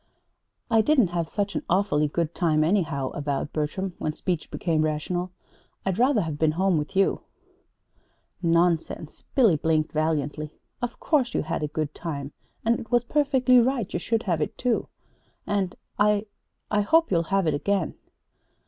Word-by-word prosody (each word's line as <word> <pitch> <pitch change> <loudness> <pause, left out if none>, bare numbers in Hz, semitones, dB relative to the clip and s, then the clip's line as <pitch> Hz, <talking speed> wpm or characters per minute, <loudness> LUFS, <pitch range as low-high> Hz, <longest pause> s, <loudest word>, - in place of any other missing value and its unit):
"I 225 -1 +6
didn't 250 - +3
have 170 -2 -2
such 205 -1 -2
an - - -1
awfully 175 -5 +2
good 165 +2 -2
time, 155 -4 +2
anyhow," 160 -7 0
avowed 145 -1 -3
Bertram, 175 +5 -2
when 155 - -2
speech 175 -4 -2
became 165 -3 0
rational. 155 +4 -1 0.6
"I'd 190 +1 -1
rather 255 -2 +4
have 155 -4 -4
been 155 -1 +3
home 185 -1 +2
with 150 +6 -6
you." 195 0 +2 1.2
"Nonsense!" 170 -2 0
blinked 215 - +4
Billy, 160 -1 +3
valiantly. 155 -1 -2 0.3
"Of 245 -1 -4
course 275 -6 +1
you - - +1
had 155 - -3
a 150 - 0
good 150 0 -3
time; 145 -4 -5 0.3
and 230 +1 +3
it 225 - -9
was 240 +1 +3
perfectly 265 -2 +3
right 245 -3 0
you - - 0
should 225 +5 -1
have 170 -5 0
it, - - -2
too! 245 -2 0 0.6
And 195 -3 -1 0.2
I 210 0 +3 0.5
I 210 0 +3
hope 325 +10 +3
you'll 170 -2 +1
have 195 -2 +2
it 155 - +2
again." 190 +4 0
175 Hz, 165 wpm, -25 LUFS, 155-210 Hz, 1.2 s, I